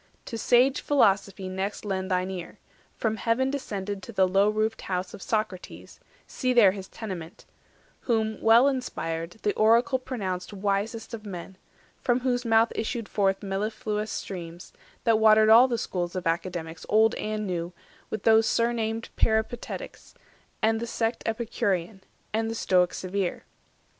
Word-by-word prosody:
To - - -6
sage 250 +4 +3
Philosophy 200 -7 +2
next 190 +3 -4
lend 190 -1 -2
thine 185 0 0
ear, 180 -2 -7 0.4
From 220 -1 -1
heaven 255 +4 +1
descended 205 -7 -4
to 235 - -9
the 190 -3 +3
low 195 +3 +3
roofed 215 +1 -1
house 180 -1 -3
Of - - -10
Socrates—see 215 +4 -4
there 220 -6 +7
his 190 -1 -8
tenement— 185 -7 -8 0.6
Whom, 220 -2 0
well 230 +4 +6
inspired, 165 - -3
the 205 - +1
Oracle 235 +4 +3
pronounced 200 -8 -4
Wisest 205 +4 -2
of 220 -2 -6
men; 190 -2 -8 0.5
from 245 -1 +1
whose 245 -1 0
mouth 225 -1 +3
issued 230 0 -3
forth 195 -1 0
Mellifluous 210 +2 -2
streams, 175 -2 -7 0.3
that 225 -3 +3
watered 215 0 +6
all 235 +4 +8
the 240 -2 -1
schools 175 -4 -3
Of 185 - -3
Academics 165 -1 -3
old 220 +2 +4
and 215 0 -3
new, 175 -2 -3 0.4
with 215 - -4
those 220 0 +5
Surnamed 230 -1 0
Peripatetics, 220 +2 -2 0.5
and 225 0 +3
the 235 - -4
sect 230 0 -1
Epicurean, 215 -4 -1 0.3
and 225 +1 0
the 225 - -3
Stoic 180 -4 +2
severe. 185 -1 -3
215 Hz, 145 wpm, -26 LUFS, 190-230 Hz, 0.6 s, all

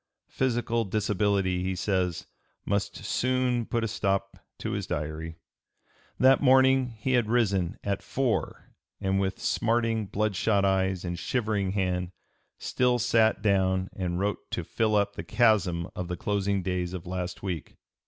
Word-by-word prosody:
Physical 120 -2 0
disability, 100 -2 0
he 95 0 -1
says, 90 -2 -1 0.4
must 100 0 -1
soon 125 -2 0
put 115 -1 -1
a - - +1
stop 100 -2 -1 0.2
to - - -4
his - - -3
Diary. 80 +2 -4 0.8
That 130 +1 +5
morning 130 -2 +4
he 130 +4 -2
had 120 -4 +2
risen 100 -7 +1
"at 100 -1 -1
four, 130 -3 -2 0.3
and 95 0 0
with 95 0 -1
smarting, 115 -2 0
bloodshot 100 0 +1
eyes 95 -1 +1
and 85 -1 -3
shivering 105 -6 -1
hand, 90 -2 -1 0.4
still 125 -1 +1
sat 115 -2 +2
down 95 -2 +2
and 90 -2 -2
wrote 100 +1 -2
to 90 - -3
fill 110 +5 0
up 100 0 +2
the - - -5
chasm 100 -8 +2
of 90 - -4
the 90 0 -4
closing 100 -1 0
days 90 -1 -2
of 90 - -7
last 90 0 -4
week." 90 -5 -4
100 Hz, 145 wpm, -27 LUFS, 95-115 Hz, 0.8 s, That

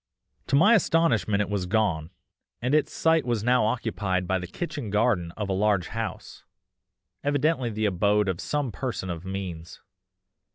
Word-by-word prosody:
To 140 - +2
my 200 +11 +6
astonishment 130 - +2
it 105 - -2
was 95 -3 -1
gone, 90 -6 0 0.5
and 125 +3 -1
its 155 -1 +2
site 160 -1 +2
was 120 -4 -1
now 125 -1 +3
occupied 100 -6 -1
by 95 +1 +1
the 90 - -6
kitchen 140 - -5
garden 105 -5 +1
of 105 -2 -2
a 95 - -1
large 100 -2 +1
house, 115 0 -6 0.8
evidently 145 -2 +1
the 110 0 -2
abode 105 +1 +2
of 90 -2 -2
some 145 -4 -2
person 100 -3 -4
of 85 +1 -7
means. 90 -4 -6
105 Hz, 160 wpm, -26 LUFS, 95-125 Hz, 0.8 s, my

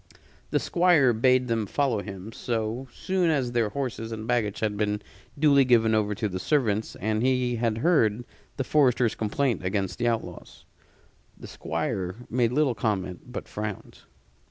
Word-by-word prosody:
The - - +1
Squire 170 -8 +3
bade 125 +2 +3
them 115 -3 -1
follow 130 -3 0
him, 100 +1 -8
so 115 +2 -3
soon 185 -2 0
as 135 -6 0
their 115 -3 +1
horses 115 -2 -4
and 110 -1 -5
baggage 115 -4 0
had 105 -2 0
been 105 0 0 0.4
duly 140 -2 +5
given 115 -3 +3
over 105 -1 +1
to 105 - -1
the 95 -2 -4
servants 110 -4 0
and 110 +1 -1
he 125 -1 +1
had 115 -1 0
heard 120 -6 +2 0.3
the 135 - 0
forester's 125 -5 +3
complaint 115 0 -1
against 95 +2 -2
the 120 - +1
outlaws. 115 -1 -4 0.7
The - - -11
Squire 90 -1 -3 0.2
made 120 -1 +2
little 140 -1 +2
comment, 105 0 -3
but - - -6
frowned. 105 -2 -6
115 Hz, 155 wpm, -26 LUFS, 105-130 Hz, 0.7 s, duly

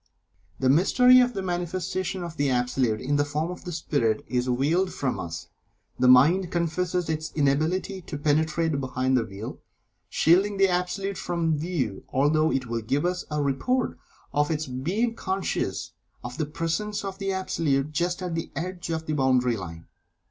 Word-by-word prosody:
The 130 - +1
mystery 250 - +6
of 245 -1 +2
the 195 - -2
manifestation 185 +1 -2
of 170 -1 -6
the 145 -2 +1
Absolute 125 -3 +1
in 145 +3 0
the 145 - +3
form 150 +4 -2
of 180 - -9
the 175 - -4
Spirit, 130 -9 0
is 125 0 -1
veiled 155 +9 +1
from 135 -2 -2
us 80 -3 -6 0.5
the 125 - +4
mind 160 +9 +6
confesses 175 +1 -1
its 155 0 -2
inability 160 +7 +1
to 160 - -6
penetrate 155 +1 +1
behind 130 0 0
the 125 - +3
veil 105 0 -7 0.5
shielding 195 +5 +3
the 195 0 +5
Absolute 180 +2 -1
from 170 -2 0
view, 145 - -2
although 155 +4 +2
it 130 -1 0
will 115 -1 -3
give 135 +8 0
us 180 0 -1
a 150 -1 -1
report 235 - 0 0.4
of 145 +1 +2
its 155 -1 -1
being 175 - -1
conscious 190 -3 -2 0.3
of 125 +3 -7
the 155 - 0
presence 165 +7 -2
of 195 0 -5
the 195 -1 -1
Absolute 155 -7 0
just 175 +3 -1
at 180 -2 -3
the 165 0 -3
edge 175 0 -4
of 160 -1 -2
the 155 - -2
boundary 130 -4 +2
line. 85 -5 -8
160 Hz, 170 wpm, -26 LUFS, 135-180 Hz, 0.5 s, mystery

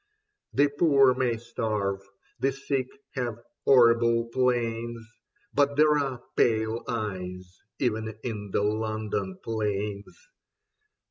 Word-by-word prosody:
The 145 +1 +4
poor 140 -3 +4
may 125 -3 0
starve, 110 -4 -2 0.4
the 135 +3 +2
sick 135 -1 -2 0.3
have 120 -4 -2 0.3
horrible 115 -2 +5
pains 120 -2 0 0.2
— 205 - -40
But 145 0 +2
there 150 +1 +5
are 135 -4 -2
pale 110 0 +2
eyes 90 -6 -5 0.2
even 110 -3 -1
in 105 -4 -4
the 100 - 0
London 110 - -2
planes. 105 -2 -3
115 Hz, 110 wpm, -27 LUFS, 110-130 Hz, 0.4 s, horrible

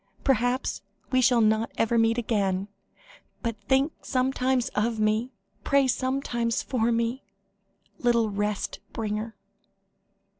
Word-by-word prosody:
Perhaps, 255 -1 +1 0.3
we 255 -1 +4
shall 245 -1 +4
not 220 +1 +2
ever 225 +1 +1
meet 225 0 +3
again 200 -4 0 0.7
but 230 -2 -1
think 270 +6 +2
sometimes 255 -1 0
of 220 +1 -1
me 215 +4 +1 0.3
pray 280 -1 +3
sometimes 255 -2 -1
for 235 -2 0
me 235 +3 -1 0.8
little 235 -3 +2
rest 205 0 -2
bringer." 220 0 -3
235 Hz, 110 wpm, -26 LUFS, 220-255 Hz, 0.8 s, we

